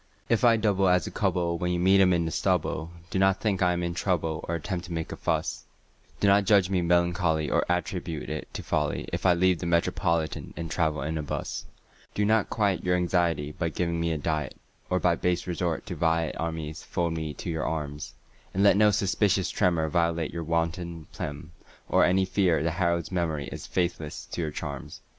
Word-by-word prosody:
If 115 Hz, 0 st, +2 dB
I 115 Hz, -2 st, +6 dB
double 100 Hz, -3 st, +2 dB
as 90 Hz, -2 st, +3 dB
a -, -, -5 dB
cub'll 85 Hz, -1 st, 0 dB
when 90 Hz, 0 st, 0 dB
you 90 Hz, -, 0 dB
meet 95 Hz, +2 st, +5 dB
him 95 Hz, -1 st, +5 dB
in 85 Hz, -2 st, +2 dB
the 80 Hz, -, -2 dB
stubble, 80 Hz, +1 st, 0 dB, 0.2 s
Do 95 Hz, -, 0 dB
not 95 Hz, 0 st, +3 dB
think 100 Hz, -4 st, 0 dB
I 90 Hz, -1 st, +4 dB
am 90 Hz, 0 st, -1 dB
in 85 Hz, 0 st, -2 dB
trouble 80 Hz, -3 st, -1 dB
or 85 Hz, -, -1 dB
at 85 Hz, -, -5 dB
tempt 90 Hz, -3 st, -3 dB
to 90 Hz, -, -10 dB
make 80 Hz, -1 st, -3 dB
a -, -, -4 dB
fuss; -, -, -2 dB, 0.5 s
Do 100 Hz, -, +2 dB
not 100 Hz, 0 st, +5 dB
judge 100 Hz, -2 st, +4 dB
me 95 Hz, -2 st, +2 dB
melancholy 85 Hz, -2 st, +1 dB
or -, -, +3 dB
at 90 Hz, 0 st, +1 dB
tribute 85 Hz, -4 st, -5 dB
it 75 Hz, 0 st, -5 dB
to -, -, -4 dB
folly -, -, -1 dB
If -, -, 0 dB
I 90 Hz, -, +5 dB
leave 90 Hz, 0 st, +3 dB
the 85 Hz, -, -3 dB
Metropolitan 85 Hz, -1 st, 0 dB
and 85 Hz, 0 st, -5 dB
travel 80 Hz, -5 st, 0 dB
'n 80 Hz, +2 st, -2 dB
a -, -, -1 dB
bus 75 Hz, -, -4 dB, 0.5 s
Do 105 Hz, -, +1 dB
not 110 Hz, 0 st, +2 dB
quiet 100 Hz, -4 st, 0 dB
your 90 Hz, 0 st, +2 dB
anxiety 85 Hz, -4 st, +1 dB
by 85 Hz, +2 st, -2 dB
giving 85 Hz, +1 st, -1 dB
me 85 Hz, 0 st, 0 dB
a 80 Hz, -, 0 dB
diet, 75 Hz, 0 st, -2 dB, 0.3 s
Or 90 Hz, -, +2 dB
by 90 Hz, -1 st, +3 dB
base 90 Hz, 0 st, 0 dB
resort 85 Hz, -2 st, -2 dB
to 90 Hz, -, -5 dB
vi 80 Hz, 0 st, +1 dB
et -, -, -8 dB
armis 80 Hz, -1 st, -4 dB
fold 85 Hz, -2 st, -2 dB
me 80 Hz, -2 st, -4 dB
to 85 Hz, -, -5 dB
your 80 Hz, -1 st, -2 dB
arms, 75 Hz, -2 st, -4 dB, 0.4 s
And 100 Hz, -, +2 dB
let 100 Hz, -1 st, +6 dB
no 105 Hz, 0 st, +6 dB
suspicious 100 Hz, -1 st, +1 dB
tremor 85 Hz, -3 st, +2 dB
violate 85 Hz, 0 st, 0 dB
your 85 Hz, -1 st, -3 dB
wonted 85 Hz, 0 st, -2 dB
phlegm 75 Hz, +2 st, -6 dB, 0.4 s
or -, -, +4 dB
Any 95 Hz, +1 st, +3 dB
fear 90 Hz, -5 st, +2 dB
that 85 Hz, -, +1 dB
Harold's 85 Hz, -1 st, 0 dB
memory 80 Hz, -5 st, -1 dB
is -, -, -7 dB
faithless 85 Hz, -4 st, -2 dB
to -, -, -3 dB
your 80 Hz, -, -1 dB
charms. 70 Hz, -2 st, -6 dB
85 Hz, 215 wpm, -27 LUFS, 80-90 Hz, 0.5 s, I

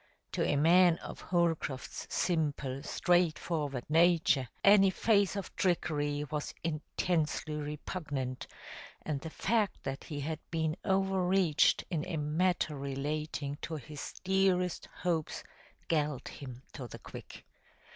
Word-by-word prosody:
To -, -, 0 dB
a -, -, +2 dB
man 170 Hz, +3 st, +6 dB
of -, -, -9 dB
Holcroft's 165 Hz, -6 st, -1 dB
simple, 145 Hz, -6 st, 0 dB
straightforward 160 Hz, -5 st, 0 dB
nature, 160 Hz, -4 st, +4 dB, 0.2 s
any 195 Hz, -1 st, +7 dB
phase 200 Hz, 0 st, +2 dB
of 200 Hz, -, -5 dB
trickery 145 Hz, -5 st, 0 dB
was 150 Hz, -1 st, -3 dB
intensely 155 Hz, 0 st, -1 dB
repugnant, 145 Hz, -3 st, -4 dB, 0.6 s
and 145 Hz, -3 st, -2 dB
the 160 Hz, -, -5 dB
fact 210 Hz, +4 st, 0 dB
that 135 Hz, 0 st, -4 dB
he 145 Hz, -3 st, -5 dB
had 155 Hz, +2 st, -3 dB
been 160 Hz, -2 st, 0 dB
overreached 190 Hz, -3 st, +3 dB
in 160 Hz, -4 st, 0 dB
a 165 Hz, -, -2 dB
matter 155 Hz, +1 st, +1 dB
relating 145 Hz, +1 st, -3 dB
to 165 Hz, -, -4 dB
his 150 Hz, +1 st, -7 dB
dearest 190 Hz, -2 st, +2 dB
hopes 170 Hz, -4 st, -2 dB, 0.4 s
galled 150 Hz, -5 st, 0 dB
him 130 Hz, -2 st, -9 dB
to 125 Hz, -, -6 dB
the -, -, -9 dB
quick. -, -, -11 dB
155 Hz, 120 wpm, -32 LUFS, 145-180 Hz, 0.6 s, any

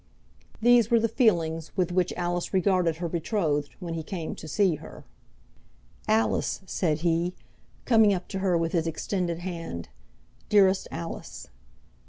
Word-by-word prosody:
These 240 Hz, -2 st, +5 dB
were 235 Hz, -, +5 dB
the 230 Hz, -, +2 dB
feelings 170 Hz, -, +1 dB
with 180 Hz, -2 st, +1 dB
which 180 Hz, 0 st, +1 dB
Alice 175 Hz, +1 st, -2 dB
regarded 185 Hz, -3 st, +2 dB
her 170 Hz, +1 st, -3 dB
betrothed 160 Hz, -4 st, -1 dB
when 170 Hz, -2 st, -5 dB
he 165 Hz, -, -3 dB
came 165 Hz, -1 st, -5 dB
to 160 Hz, -, -10 dB
see 175 Hz, +1 st, +2 dB
her. 150 Hz, -, -12 dB, 1.0 s
"Alice," 220 Hz, -1 st, +1 dB
said 160 Hz, -5 st, -1 dB
he, 170 Hz, +1 st, +1 dB, 0.5 s
coming 220 Hz, -4 st, +5 dB
up 185 Hz, -2 st, -2 dB
to 195 Hz, -, -3 dB
her 185 Hz, -3 st, +2 dB
with 165 Hz, -1 st, -1 dB
his 165 Hz, -2 st, 0 dB
extended 170 Hz, +1 st, -2 dB
hand, 165 Hz, -, -6 dB, 0.6 s
"Dearest 195 Hz, -2 st, +4 dB
Alice!" 165 Hz, -, -7 dB
175 Hz, 145 wpm, -27 LUFS, 165-195 Hz, 1.0 s, These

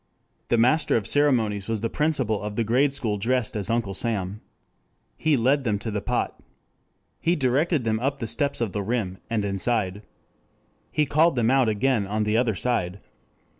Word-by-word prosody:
The 120 Hz, -, +2 dB
master 145 Hz, +6 st, +3 dB
of 105 Hz, -, -3 dB
ceremonies 115 Hz, -9 st, +2 dB
was 110 Hz, -2 st, -2 dB
the 115 Hz, -, 0 dB
principal 135 Hz, -9 st, 0 dB
of 105 Hz, 0 st, -5 dB
the 115 Hz, -, +1 dB
grade 130 Hz, +6 st, +2 dB
school 110 Hz, -7 st, -2 dB
dressed 125 Hz, +2 st, 0 dB
as 100 Hz, -3 st, -2 dB
Uncle 115 Hz, -4 st, 0 dB
Sam. 100 Hz, -2 st, -2 dB, 0.7 s
He 155 Hz, -3 st, +2 dB
led 135 Hz, +4 st, +2 dB
them 110 Hz, -5 st, 0 dB
to 110 Hz, +2 st, -5 dB
the 105 Hz, -1 st, -2 dB
pot. -, -, -2 dB, 0.8 s
He 170 Hz, +2 st, +1 dB
directed 145 Hz, +2 st, +1 dB
them 110 Hz, -1 st, 0 dB
up 135 Hz, +3 st, -1 dB
the 120 Hz, -, -4 dB
steps 140 Hz, +5 st, -1 dB
to 120 Hz, -, +1 dB
the 105 Hz, -1 st, -4 dB
rim, 100 Hz, -3 st, -2 dB
and 110 Hz, -3 st, 0 dB
inside. 100 Hz, 0 st, -1 dB, 0.9 s
He 150 Hz, -, +2 dB
called 155 Hz, +2 st, +3 dB
them 120 Hz, -1 st, +2 dB
out 130 Hz, -4 st, +3 dB
again 110 Hz, -1 st, +1 dB
on 105 Hz, +2 st, -1 dB
the 105 Hz, +1 st, 0 dB
other 115 Hz, -2 st, +2 dB
side. 95 Hz, -3 st, -1 dB
115 Hz, 180 wpm, -25 LUFS, 105-135 Hz, 0.9 s, master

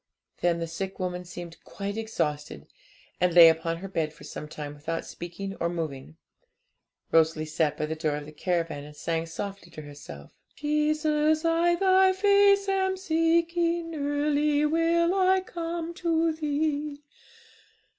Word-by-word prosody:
Then 175 Hz, -1 st, +2 dB
the 165 Hz, -, -2 dB
sick 190 Hz, +4 st, -5 dB
woman 180 Hz, -1 st, -3 dB
seemed 175 Hz, -1 st, -9 dB
quite 200 Hz, 0 st, -5 dB
exhausted, 150 Hz, -10 st, -3 dB, 0.5 s
and 180 Hz, -1 st, +1 dB
lay 170 Hz, -2 st, +10 dB
upon 165 Hz, +1 st, -1 dB
her 190 Hz, +3 st, -7 dB
bed 160 Hz, -5 st, -2 dB
for 150 Hz, -, -16 dB
some 150 Hz, -, -7 dB
time 150 Hz, -1 st, -7 dB
without 160 Hz, +3 st, -4 dB
speaking 195 Hz, +3 st, -7 dB
or 170 Hz, -, 0 dB
moving. 160 Hz, -3 st, -5 dB, 0.9 s
Rosalie 160 Hz, -1 st, +3 dB
sat 155 Hz, -1 st, 0 dB
by 155 Hz, -, -1 dB
the 155 Hz, -, -3 dB
door 155 Hz, -2 st, -1 dB
of 150 Hz, 0 st, -6 dB
the 150 Hz, -, -10 dB
caravan, 165 Hz, -3 st, -2 dB
and 150 Hz, +1 st, -12 dB
sang 165 Hz, +2 st, -2 dB
softly 195 Hz, +2 st, -6 dB
to 155 Hz, -2 st, -10 dB
herself 145 Hz, -, -11 dB, 0.2 s
'Jesus, 300 Hz, +1 st, +1 dB
I 335 Hz, +1 st, +3 dB
Thy 375 Hz, +1 st, +4 dB
face 400 Hz, 0 st, +4 dB
am 380 Hz, -1 st, +1 dB
seeking, 335 Hz, 0 st, +1 dB
Early 290 Hz, 0 st, +1 dB
will 335 Hz, +2 st, +2 dB
I 380 Hz, 0 st, +3 dB
come 335 Hz, -2 st, -5 dB
to 330 Hz, -2 st, +1 dB
Thee.' 295 Hz, -1 st, -2 dB
225 Hz, 145 wpm, -27 LUFS, -, 0.9 s, lay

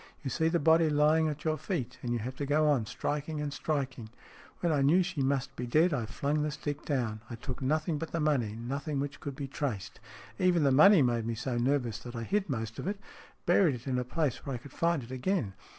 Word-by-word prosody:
You 135 Hz, -, -3 dB
see 160 Hz, +3 st, +1 dB
the 165 Hz, +1 st, +2 dB
body 160 Hz, 0 st, +4 dB
lying 155 Hz, +2 st, +4 dB
at 150 Hz, -1 st, -4 dB
your 155 Hz, -1 st, 0 dB
feet, 130 Hz, -, -3 dB
and 120 Hz, -, -3 dB
you 120 Hz, -, +1 dB
have 125 Hz, +4 st, -5 dB
to 145 Hz, -, -2 dB
go 150 Hz, +2 st, +3 dB
on 130 Hz, -7 st, +2 dB
striking 150 Hz, +7 st, -3 dB
and 145 Hz, -1 st, -3 dB
striking. 135 Hz, -7 st, -3 dB, 0.5 s
When 170 Hz, -, +2 dB
I 145 Hz, -3 st, +2 dB
knew 165 Hz, +7 st, +5 dB
she 150 Hz, -, -3 dB
must 135 Hz, 0 st, 0 dB
be 125 Hz, -, -4 dB
dead, 155 Hz, +7 st, +3 dB
I 120 Hz, -6 st, -1 dB
flung 145 Hz, +6 st, -1 dB
the 150 Hz, -, 0 dB
stick 145 Hz, 0 st, -4 dB
down. 120 Hz, -7 st, -1 dB
I 120 Hz, -, -5 dB
took 125 Hz, +3 st, -6 dB
nothing 155 Hz, +3 st, 0 dB
but 165 Hz, -, -5 dB
the 165 Hz, -, -1 dB
money, 140 Hz, -9 st, +1 dB
nothing 140 Hz, +5 st, -3 dB
which 140 Hz, 0 st, -4 dB
could 140 Hz, -2 st, -6 dB
be 140 Hz, -1 st, -5 dB
traced. 130 Hz, -7 st, -4 dB, 0.4 s
Even 180 Hz, -3 st, +3 dB
the 140 Hz, -, +4 dB
money 165 Hz, +4 st, +7 dB
made 120 Hz, -2 st, 0 dB
me 115 Hz, -, -1 dB
so 125 Hz, +2 st, -3 dB
nervous 125 Hz, -3 st, 0 dB
that 120 Hz, 0 st, -9 dB
I 115 Hz, -, -3 dB
hid 195 Hz, -, 0 dB
most 115 Hz, -4 st, -3 dB
of -, -, -4 dB
it 205 Hz, +1 st, -1 dB, 0.5 s
buried 175 Hz, -4 st, +4 dB
it 120 Hz, -, -10 dB
in 130 Hz, -2 st, 0 dB
a -, -, 0 dB
place 140 Hz, +1 st, -1 dB
where 135 Hz, -3 st, -3 dB
I -, -, -3 dB
could 130 Hz, +3 st, -13 dB
find 170 Hz, -5 st, +1 dB
it 115 Hz, -, -11 dB
again. 130 Hz, -, -1 dB
140 Hz, 245 wpm, -30 LUFS, 125-155 Hz, 0.5 s, money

